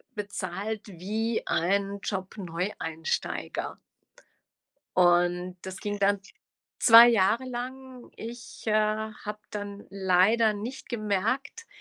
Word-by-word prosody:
bezahlt 205 +1 -4
wie 210 +5 -2
ein 200 +3 0
Job-Neueinsteiger. 180 -4 -3 1.2
Und 175 0 +3
das 190 0 -7
ging 205 -1 -4
dann 200 0 +3 0.6
2 230 0 +10
Jahre 225 +1 +3
lang. 255 0 -7
Ich, 235 +2 -9
äh, 220 - +1
habe 215 0 -1
dann 205 -1 -6
leider 195 +4 +3
nicht 230 +6 -7
gemerkt, 230 - -2
205 Hz, 90 wpm, -28 LUFS, 190-230 Hz, 1.2 s, 2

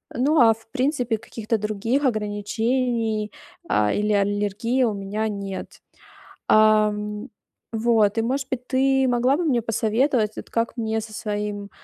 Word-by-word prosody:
Ну, 290 +6 +2
а, 225 -2 +7
в 225 0 -19
принципе, 255 -4 0
каких-то 225 +1 -3
других 215 +6 -1
ограничений, 220 0 -1 0.4
а, 105 0 +2
или 210 +1 0
аллергии 205 +5 0
у 225 -4 +1
меня 205 +2 -3
нет. 200 -2 -6 0.7
Ам. 210 -1 +3 0.5
Вот, 225 -2 +2
и, - - +3
может 265 +3 -1
быть, 250 -1 -4
ты 265 0 +2
могла 250 +3 +2
бы 350 - -1
мне 250 -6 +2
посоветовать, 225 +1 0
вот, - - -8
как 230 0 -1
мне 220 -1 -1
со 215 0 -9
своим, 205 -1 -4
220 Hz, 140 wpm, -23 LUFS, 210-245 Hz, 0.7 s, а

